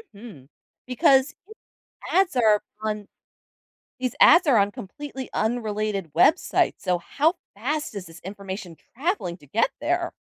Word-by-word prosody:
Mhm, 200 - -12 0.4
because 270 +1 +3 0.8
ads 370 -5 +2
are 215 -3 +4 0.2
on 210 -2 -3 0.9
these 255 -2 -2
ads 345 +3 +7
are 265 -5 +5
on 200 0 +3
completely 265 +6 -8
unrelated 215 -6 -2
websites, 305 - +3
so 180 -1 0
how 310 - +1 0.2
fast 290 +4 -3
is 195 -2 -6
this 165 0 -13
information 190 -2 -7 0.2
traveling 265 - -2
to 145 - -19
get 225 - +1
there? 345 +3 -1
220 Hz, 130 wpm, -24 LUFS, 195-290 Hz, 0.9 s, ads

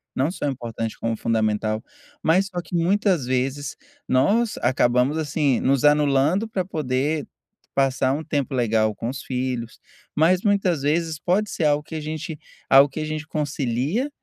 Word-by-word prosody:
não 135 +5 +1
só 160 - -3
importante 115 -4 -4
como 115 -1 -2
fundamental. 110 -1 0 0.4
Mas 185 +5 +3
só 180 -3 -4
que, 175 - -15
muitas 180 -3 +2
vezes, 135 +3 -2 0.3
nós 210 - +2
acabamos, 125 +3 +2
assim, 145 -4 +1
nos 135 -1 +1
anulando 150 +6 +3
pra 200 -4 -2
poder 150 -3 -1 0.5
passar 135 -1 +2
um 150 +3 -3
tempo 145 -4 -2
legal 110 -3 +2
com 115 - -4
os 135 +2 -5
filhos, 125 -3 -4 0.4
mas 175 +4 +3
muitas 195 -7 +2
vezes 155 +2 0
pode 195 +6 +1
ser 160 - -1
algo 150 0 +2
que 160 - -9
a 155 - -3
gente 155 +1 -5 0.3
algo 135 +1 +7
que 140 - -6
a - - -2
gente 155 0 -4
concilia 150 - -1
145 Hz, 160 wpm, -23 LUFS, 130-160 Hz, 0.5 s, algo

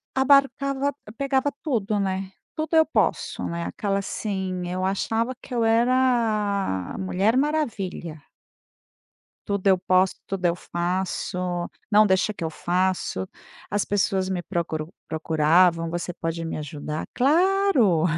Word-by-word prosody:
Abarcava 275 +1 +3 0.2
pegava 275 0 +1
tudo, 215 -7 0
né, 190 0 -2 0.2
tudo 315 +1 -1
eu 320 0 +6
posso, - - 0
né, 170 0 -3
aquela 200 -1 -1
assim 190 -3 -3
eu 185 +1 -3
achava 225 +5 0
que 255 - -10
eu 235 -1 +1
era 225 - +2
a - - -6
mulher 195 +5 +1
maravilha. 220 - -2 1.3
Tudo 200 -2 -1
eu 190 -1 +6
posso, 185 +1 +2
tudo 190 -2 -3
eu 170 0 +3
faço, 180 +1 -2 0.5
não 210 +1 +7
deixa 195 +2 +2
que 170 - -7
eu 160 - -1
faço, 175 - -1 0.4
as 205 0 0
pessoas 190 -2 0
me 180 -2 -1
procuram 165 -3 -3 0.2
procuravam, 165 +2 +3
"Você 175 +1 -3
pode 165 0 -3
me 165 - -4
ajudar? 150 +1 -5
Claro." 300 - +3
195 Hz, 130 wpm, -24 LUFS, 175-240 Hz, 1.3 s, não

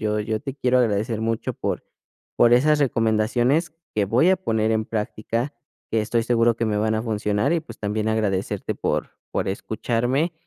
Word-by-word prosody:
yo 105 0 0
yo 110 +1 -2
te 135 -1 -5
quiero 130 -2 +2
agradecer 110 -1 +1
mucho, 115 0 -1
por - - -3 0.5
por 120 - +5
esas 150 +5 +4
recomendaciones 120 +5 +2 0.2
que 105 -2 +2
voy 125 - +3
a 190 - +4
poner 110 -9 0
en 110 0 +1
práctica, 115 +4 -3 0.4
que 115 - +3
estoy 115 +2 0
seguro 115 -1 +3
que 115 - -1
me 105 - 0
van 110 +1 +1
a 110 - -1
funcionar, 105 +3 0
y 170 - +2
pues 160 - -12
también 105 +1 -1
agradecerte 105 -4 -1
por - - -2 0.2
por - - -1
escucharme, 120 - -1
115 Hz, 180 wpm, -23 LUFS, 110-125 Hz, 0.5 s, por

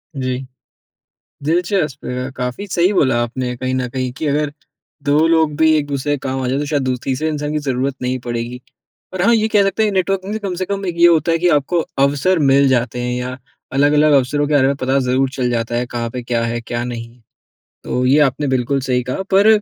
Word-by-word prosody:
जी। 130 -2 -2 1.1
दिलचस्प, 165 -3 0
अ, 125 +1 -3
काफ़ी 125 +10 -4
सही 180 +3 +2
बोला 135 -10 +2
आपने 125 +1 -3
कहीं 130 +1 -2
न 130 -1 -1
कहीं 130 0 -3
कि 155 - -2
अगर 145 0 0 0.5
2 150 +3 +3
लोग 160 -2 +2
भी 160 0 +4
एक-दूसरे 145 -1 -1
के 145 - 0
काम 130 0 -2
आ - - -1
जाएँ 130 +2 0
तो 145 - -2
शायद 145 -1 0
दू 130 -1 0
तीसरे 135 +4 -1
इंसान 150 -1 -3
की 155 - 0
ज़रूरत 135 -1 -1
नहीं 125 +1 -1
पड़ेगी। 120 +1 -4 0.5
और 185 - -1
हाँ 235 +5 +5
ये 220 -1 +2
कह 210 -2 +4
सकते 195 +2 +1
हैं 210 - 0
नेटवर्किंग 190 +1 -1
से 220 - -2
कम 200 -4 -4
से 185 - -2
कम 195 +1 -3
एक 175 - -2
ये 170 - +7
होता 165 -1 +3
है 165 - +2
कि 175 +2 +2
आपको 155 +2 +2 0.2
अवसर 145 +6 +2
मिल 140 -2 +4
जाते 125 -1 0
हैं 125 0 -2
या 125 +1 -4 0.3
अलग-अलग 145 +2 +4
अवसरों 145 +2 +2
के 150 - +1
बारे 135 -2 +4
में 140 +1 +1
पता 135 0 0
ज़रूर 130 +1 +1
चल 125 -2 -1
जाता 115 -1 -2
है, 120 +1 0
कहाँ 120 -1 -4
पे 125 +1 -5
क्या 120 -1 -1
है? 115 0 -2
क्या 120 +1 -4
नहीं? 120 0 -7 0.6
तो 125 - -1
ये 135 +4 +4
आपने 145 0 +2
बिल्कुल 130 +1 0
सही 125 -1 0
कहा 130 +9 -3
पर 195 +2 +5
140 Hz, 225 wpm, -18 LUFS, 125-160 Hz, 1.1 s, ये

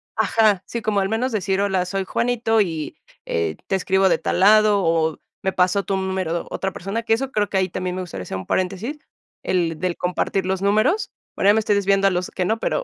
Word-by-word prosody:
ajá, 215 -4 +2
sí, 235 - -4
como 215 -2 0
al 195 - -1
menos 240 +3 -1
decir: 195 -2 0
"Hola, 190 -3 +1
soy 195 +1 -2
Juanito 230 +1 0
y 165 -6 -3 0.3
eh 80 -2 -1
te - - +1
escribo 190 0 +2
de - - +3
tal - - -1
lado 210 0 +5
o 165 -2 +1 0.2
me 190 0 0
pasó 185 +2 +2
tu 195 - -1
número 190 -3 -2
otra 190 0 -2
persona", 200 +5 -4
que 225 - +2
eso 265 +4 -1
creo 205 -1 0
que 195 - -1
ahí 190 0 +1
también 180 +1 -3
me 185 - -3
gustaría 160 - -6
hacer 95 - -5
un 95 - -7
paréntesis, 195 +10 -2 0.5
el 170 -4 0
del 180 0 -2
compartir 180 +1 -1
los 190 0 -1
números. 215 - +2 0.2
Bueno 200 - +3
ya - - +4
me 220 - +3
estoy 210 -1 +1
desviando 195 0 +3
a - - +3
los 180 0 -2
que 185 - -2
no, 220 +4 0
pero - - -1
195 Hz, 230 wpm, -22 LUFS, 180-215 Hz, 0.5 s, lado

